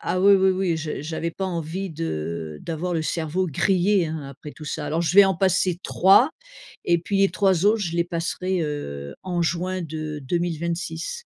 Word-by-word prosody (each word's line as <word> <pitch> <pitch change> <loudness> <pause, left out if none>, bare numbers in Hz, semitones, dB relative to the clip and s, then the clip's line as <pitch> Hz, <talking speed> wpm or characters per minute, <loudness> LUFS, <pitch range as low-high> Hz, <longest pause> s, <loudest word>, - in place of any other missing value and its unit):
ah 185 - -1
oui, 200 0 +7
oui, 190 0 +4
oui. 185 -3 0
J 155 -3 -4
j'avais 160 +2 -3
pas 190 - -4
envie 175 +1 -3
de 80 - -4
d'avoir 170 +2 -3
le 160 - 0
cerveau 165 +3 -1
grillé 185 +4 +2
hein, 155 0 -4
après 145 +2 -10
tout 155 - -11
ça. 150 0 -4
Alors 165 +2 0
je 170 - 0
vais 200 - +10
en 190 -1 +2
passer 185 -1 +2
3 200 - +5 0.5
et 170 0 +3
puis 195 +4 -2
les 195 0 +4
3 190 -1 +2
autres, 220 +2 +4
je 170 -4 -2
les 170 - +2
passerai, 175 +1 -2
heu, 70 - -5
en 175 -2 -1
juin 180 +2 -1
de 155 -1 -5
2026. 170 - -3
170 Hz, 190 wpm, -24 LUFS, 155-185 Hz, 0.5 s, vais